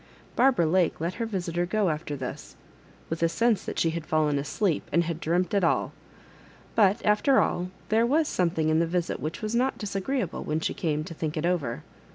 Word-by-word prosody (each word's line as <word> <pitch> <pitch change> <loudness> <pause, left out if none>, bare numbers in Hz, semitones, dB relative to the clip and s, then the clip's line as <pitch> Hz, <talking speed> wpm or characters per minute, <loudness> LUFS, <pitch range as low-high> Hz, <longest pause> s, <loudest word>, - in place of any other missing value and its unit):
Barbara 250 -8 +4
Lake 175 +1 +2
let 170 +3 -2
her 230 - 0
visitor 175 -4 -2
go^after 170 -7 -1
this, 130 -2 -7 0.5
with 165 0 -4
a 165 - +3
sense 230 +2 +1
that - - -5
she 165 - +2
had 165 0 -4
fallen 155 -2 +1
asleep, 160 +4 0
and 170 +3 +3
had 165 -1 -3
dreamt 175 +3 0
it 200 -2 +2
all; 170 - +1 0.8
but, 205 -1 +3
after 210 +6 +4
all, 180 +1 0 0.2
there 220 +2 +3
was 305 +4 +2
something 165 -3 0
in 155 0 +3
the 165 - +2
visit 175 0 -1
which 155 +8 -5
was 215 +1 -2
not 255 +3 +1
disagreeable 200 - -2
when 155 +1 -1
£e - - -1
came 155 -2 -1
to 165 - -8
think 155 -1 -4
it 155 - -1
over. 145 - -1
175 Hz, 200 wpm, -27 LUFS, 160-210 Hz, 0.8 s, Barbara